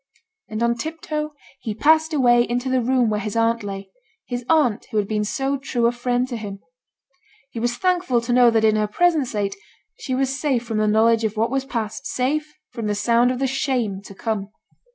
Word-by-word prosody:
And 220 +1 -2
on 235 0 +3
tip 315 +5 -5
toe 300 -1 -3 0.2
he 215 -2 -4
passed 315 +5 +4
away 245 -5 +4
into 245 +2 -1
the 260 -1 +2
room 245 -2 +2
where 210 - 0
his 210 +1 -4
aunt 230 0 +2
lay; 195 -1 -7 0.3
his 245 -1 -4
aunt 275 -9 +2
who 220 - -3
had 205 -2 +1
been 210 0 0
so 270 +6 -1
true 250 -3 -1
a 235 - +4
friend 245 +1 -1
to 240 - -3
him! 205 -3 -6 0.9
He 230 - -5
was 240 +1 -1
thankful 360 -9 +1
to 240 +1 -1
know 245 -1 +6
that 225 -1 +2
in 215 0 +4
her 210 0 +1
present 315 +4 +2
state 205 -3 -2 0.4
she 260 - -2
was 265 0 -1
safe 260 -5 0
from 225 -2 -2
the 215 - +2
knowledge 225 +2 +3
of 215 0 -2
what 225 +2 +1
was 270 0 -1
past, 220 -5 -4
safe 300 +4 -1 0.2
from 230 -3 -4
the 210 - 0
sound 235 +4 +3
of 255 - -1
the 270 - 0
shame 255 -7 -1
to 195 - -11
come. 210 -2 -3
240 Hz, 215 wpm, -22 LUFS, 215-265 Hz, 0.9 s, know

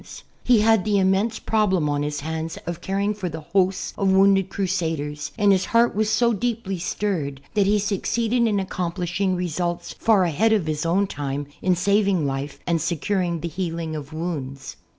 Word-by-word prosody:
He 240 -4 +4
had 220 -2 +4
the 210 -1 +1
immense 195 +4 +2
problem 190 -8 +1
on 145 0 0
his 145 0 -3
hands 160 +2 -4
of 170 0 -5
caring 200 +2 -1
for 195 -4 -4
the 160 0 -6
hosts 185 +4 0
of 195 -2 +1
wounded 195 0 +4
crusaders, 160 -6 -2
and 205 -1 +4
his 190 -1 +2
heart 235 +1 +3
was 215 +1 0
so 235 +2 +3
deeply 220 -4 -2
stirred 165 -7 -2
that 205 -2 +2
he 210 +1 +3
succeeded 225 +4 0
in 205 -2 +1
accomplishing 185 0 -2
results 175 0 -3
far 215 -4 +3
ahead 205 +7 +2
of 205 -7 +1
his 155 +1 -2
own 190 +4 +2
time 145 -5 -4 0.2
in 185 -1 +2
saving 200 -2 +2
life 140 +1 -3
and 170 -2 +1
securing 170 +1 -1
the 170 - -3
healing 165 -2 -3
of 145 -1 -7
wounds. 150 -5 -5
185 Hz, 175 wpm, -23 LUFS, 160-205 Hz, 0.2 s, He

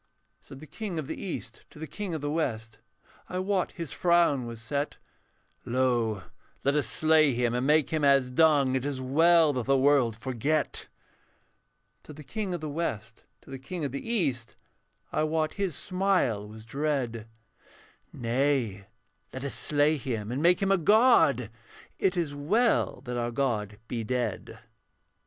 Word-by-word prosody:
Said 135 - -12
the - - -9
King 195 +1 -6
of 155 - -3
the - - -5
East 185 - -6
to - - -17
the 160 - -6
King 190 +1 -5
of 155 - -4
the 145 0 -2
West, 115 -8 -3 0.5
I 180 - -4
wot 185 0 -1
his 165 -5 -6
frown 170 -8 +2
was 115 -1 -8
set, 140 +5 -3 0.7
'Lo; 120 -5 0 0.4
let 140 +1 +2
us 145 -6 +1
slay 155 +3 +3
him 120 0 0
and 125 +2 0
make 150 -1 +3
him 155 -2 0
as 135 -2 +4
dung, 145 -2 +4
It 130 - -1
is 140 -2 -3
well 160 +4 +4
that 125 -2 -3
the 135 0 +4
world 130 -5 +3
forget.' 130 +5 -2 1.2
Said 150 - -11
the 155 - -10
King 195 +4 -3
of 170 - -6
the 155 - -4
West 115 -8 -4 0.2
to - - -15
the 135 - -6
King 155 +4 -5
of 140 - -3
the 140 - -4
East, 135 - -1 0.6
I - - 0
wot 155 0 0
his 195 -6 -2
smile 180 - 0
was 110 +1 -12
dread, 125 -4 -2 0.8
'Nay, 120 -5 -1 0.4
let 130 +1 -6
us 140 - -3
slay 150 +1 +2
him 115 -6 -4
and 130 +4 -2
make 175 +3 +4
him 195 - +2
a 195 - +5
god, 170 - +4 0.5
It 190 -1 +1
is 160 -5 -1
well 205 +12 +1
that 125 -3 -5
our 120 0 -1
god 115 -5 -2
be 115 -2 -3
dead.' 125 +2 -3
140 Hz, 170 wpm, -28 LUFS, 120-160 Hz, 1.2 s, a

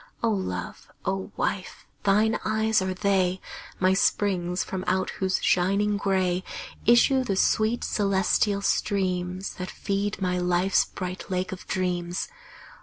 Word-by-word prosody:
O 230 - +3
Love, 90 - -4 0.2
O 195 +1 -2
Wife, 190 -2 -3 0.2
thine 210 +2 +3
eyes 220 -1 +2
are 190 0 -2
they, 190 -2 +1 0.4
My 185 0 +4
springs 185 -2 +1
from 185 -1 -4
out 185 0 +1
whose 190 -1 0
shining 200 +3 +2
gray 185 -2 +1 0.4
Issue 255 +3 +5
the 200 -6 -1
sweet 215 +4 +2
celestial 200 0 +1
streams 185 -2 -1
That 185 - -4
feed 200 +1 -2
my 180 -1 0
life's 180 +2 +2
bright 185 +1 -6
Lake 185 0 -1
of 190 - -8
Dreams. 175 -1 -2
190 Hz, 130 wpm, -26 LUFS, 180-205 Hz, 0.4 s, Issue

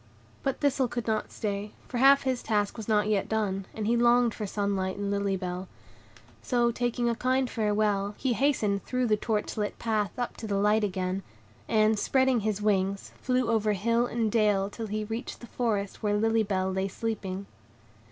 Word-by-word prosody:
But 270 - -1
Thistle 275 -3 +2
could 240 -1 -4
not 220 -1 -1
stay, 205 0 -3
for 245 - -3
half 275 +2 +6
his 260 -2 0
task 205 -2 0
was 220 -3 -7
not 210 -2 +2
yet 210 -2 0
done; 195 -3 -1
and 215 - -4
he 230 +2 +2
longed 240 -1 +4
for 210 - -4
sunlight 195 -2 -1
and 200 0 -2
Lily 200 -1 0
Bell. 180 0 -4 0.7
So, 240 - +2
taking 240 0 -1
a 235 - +2
kind 255 +2 +1
farewell, 210 -2 0
he 260 -3 0
hastened 215 -7 +1
through 250 0 -1
the 215 -2 +3
torch 210 0 -2
lit 210 -1 -2
path 215 -4 -1
up 245 -1 -3
to 220 - -6
the 200 -1 0
light 210 +2 +3
again; 185 -1 -1 0.5
and, 215 -1 +3
spreading 260 0 +3
his 210 -1 -2
wings, 195 -1 0
flew 255 -1 +1
over 220 -2 +2
hill 230 +4 +1
and 230 -3 -1
dale 205 -3 +2
till 225 +1 -5
he 215 +1 -2
reached 225 +3 -5
the - - -10
forest 215 -5 -2
where 205 -1 +1
Lily 225 +1 +2
Bell 190 -2 0
lay 190 +1 -1
sleeping. 195 -2 -4
215 Hz, 190 wpm, -28 LUFS, 200-235 Hz, 0.7 s, half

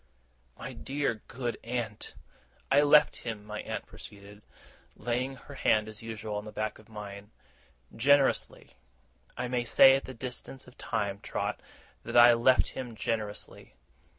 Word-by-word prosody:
'My - - -7
dear, 135 -6 -2
good 120 -1 -4
aunt!' 115 -3 -4 0.6
'I 140 +1 +6
left 150 0 +5
him,' 110 -3 -6
my 105 0 -5
aunt - - -5
proceeded, 100 0 -13 0.5
laying 125 +4 -2
her 125 - -13
hand 110 0 +2
as 110 -1 -7
usual 110 -2 -5
on 105 - -5
the 105 - -8
back 110 0 -3
of 110 - -19
mine, 105 -1 -9 0.7
'generously. 140 +4 +2 0.6
I 125 - -2
may 120 -1 -1
say 135 +3 +7
at 135 - -2
this 130 -2 -9
distance 130 +1 -7
of 125 - -15
time, 100 -1 -2
Trot, - - -3 0.4
that - - -1
I 120 0 +9
left 120 +2 +4
him 125 -3 -7
generously. 105 - -4
115 Hz, 150 wpm, -29 LUFS, 105-130 Hz, 0.7 s, I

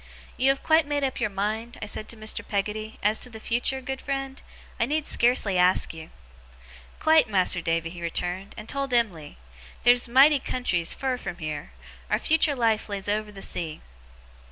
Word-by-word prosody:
'You 260 +2 +3
have 270 0 +1
quite 315 -1 +4
made 290 -1 -1
up 265 -1 -1
your 235 -3 0
mind,' 215 +4 -3
said 210 +1 -2
I - - -24
to 230 - -10
Mr. 215 0 -3
Peggotty, 215 +2 -3
'as 210 +2 +3
to 250 - -3
the 220 -2 -10
future, 245 +4 -1
good 265 +1 -5
friend? 270 -1 -4 0.4
I 230 - +2
need 300 +2 -1
scarcely 235 -6 +2
ask 180 -1 +3
you.' 160 -1 -10 0.9
'Quite, 315 -6 +4
Mas'r 185 -3 +4
Davy,' 165 0 -1
he 175 -1 -9
returned; 180 +3 -3
'and 215 - -8
told 275 -1 -1
Em'ly. 180 -11 -1 0.5
Theer's 245 +1 +5
mighty 275 +4 +6
countries, 180 -11 -1
fur 260 -2 -1
from 175 -6 -6
heer. 155 - -5 0.4
Our - - +2
future 310 -2 +2
life 225 -3 +1
lays 200 -1 -4
over 210 +1 -1
the 195 -1 -9
sea. 160 -2 -5
220 Hz, 180 wpm, -26 LUFS, 190-265 Hz, 0.9 s, mighty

